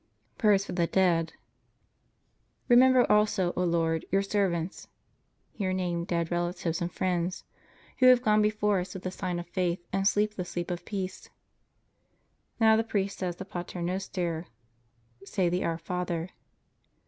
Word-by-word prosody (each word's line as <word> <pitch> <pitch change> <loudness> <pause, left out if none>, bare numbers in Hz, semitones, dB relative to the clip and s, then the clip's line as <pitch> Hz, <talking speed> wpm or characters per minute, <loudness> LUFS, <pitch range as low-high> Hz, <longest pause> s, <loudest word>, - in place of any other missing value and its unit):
PRAYER 210 -3 +5
FOR 195 -1 -5
THE 175 -2 +1
DEAD 170 -3 +2 1.3
Remember 255 0 +6
also, 210 -4 +2
O 180 - 0
Lord, 165 -1 +1
Your 195 +1 +2
servants 190 -4 -1 0.6
(here 190 -3 -2
name 175 -2 -1
dead 170 -2 -1
relatives 175 -1 -2
and 170 +1 -2
friends) 180 0 -1 0.6
who 255 - +6
have 250 -1 +6
gone 215 -1 +4
before 210 -2 +2
us 180 +1 -6
with 190 - -7
the 185 - -3
sign 185 -2 -3
of 175 - -5
faith 175 0 -2
and 195 0 +2
sleep 210 +1 +2
the 185 - -4
sleep 175 0 -4
of 175 - -5
peace. 190 -3 -5 1.3
Now 220 -1 +6
the 225 - +2
priest 200 -3 -2
says 180 -2 -2
the 190 - -8
"Pater 175 -1 -6
Noster." 175 -2 -3 0.8
Say 190 -2 0
the 180 +1 -1
"Our 165 -1 -1
Father." 175 0 -3
185 Hz, 150 wpm, -28 LUFS, 175-200 Hz, 1.3 s, Remember